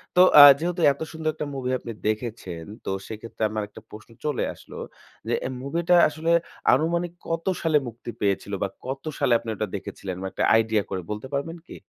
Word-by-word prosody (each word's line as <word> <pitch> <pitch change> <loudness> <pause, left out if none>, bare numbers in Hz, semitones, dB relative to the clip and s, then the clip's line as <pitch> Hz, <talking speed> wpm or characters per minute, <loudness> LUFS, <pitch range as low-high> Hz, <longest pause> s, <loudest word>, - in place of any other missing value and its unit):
তো 180 - +7 0.2
আ - - +13 0.2
যেহেতু 175 +1 -2
এত 140 - -17
সুন্দর 160 -1 -2
একটা 150 - -4
মুভি 130 -2 -3
আপনি 115 - -7 0.2
দেখেছেন, 110 -6 -3 0.2
তো - - -3 0.2
সেক্ষেত্রে 110 +1 -6
আমার 110 0 -2
একটা 105 - -13
প্রশ্ন 110 +2 -12 0.2
চলে 150 -4 0
আসলো। - - -14 0.5
যে - - 0
এ - - -2
মুভিটা 170 +5 +2
আসলে 160 +2 -2 0.4
আনুমানিক 170 +5 +1 0.2
কত 165 0 -2 0.2
সালে 160 -2 +3
মুক্তি 120 +1 -9
পেয়েছিল? 100 0 0
বা - - +1 0.2
কত 135 +1 -4 0.2
সালে 135 -4 +3
আপনি 115 - -8
ওটা 105 0 -2
দেখেছিলেন 95 -1 -6
বা - - -4
একটা - - -2
আইডিয়া 110 -2 +2
করে 95 -2 -3
বলতে 105 +4 -5
পারবেন 165 +5 -3
কি? - - -10
125 Hz, 190 wpm, -25 LUFS, 110-160 Hz, 0.5 s, আ